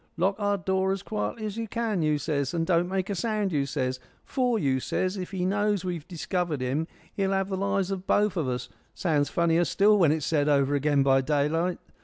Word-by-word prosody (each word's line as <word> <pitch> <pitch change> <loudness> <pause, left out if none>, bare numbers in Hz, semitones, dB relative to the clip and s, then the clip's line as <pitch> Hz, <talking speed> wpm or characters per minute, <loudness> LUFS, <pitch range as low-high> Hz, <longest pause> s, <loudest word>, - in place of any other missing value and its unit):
'Lock 190 +3 +2
our 205 -1 +1
door 190 +1 0
as 195 0 -3
quietly 105 - -3
as 210 0 -4
you 225 - -3
can,' 220 -4 -1
you 155 -1 +2
says, 140 0 -2
'and 165 -1 0
don't 175 0 +2
make 190 0 -1
a - - 0
sound,' 210 0 -1
you 140 -3 0
says, 130 -2 -2 0.3
'for,' 250 -3 +1
you 135 -8 +1
says, 185 +8 -1
'if 185 -2 -5
he 185 -2 -2
knows 205 0 +1
we've 175 -4 -4
discovered 175 -3 -2
him 135 +6 -1 0.3
he'll 195 -1 0
have 195 0 0
the 190 - -1
lives 195 0 0
of 190 -1 -4
both 205 -2 +2
of 160 -6 -1
us.' 125 -1 -3 0.3
Sounds 150 -5 +1
funnier 170 0 +2
still 205 +4 +4
when 165 -5 +5
it's 155 -2 -1
said 150 -2 +1
over 140 -1 +3
again 145 0 +2
by 135 -1 +4
daylight. 150 +5 0
175 Hz, 220 wpm, -27 LUFS, 145-195 Hz, 0.3 s, when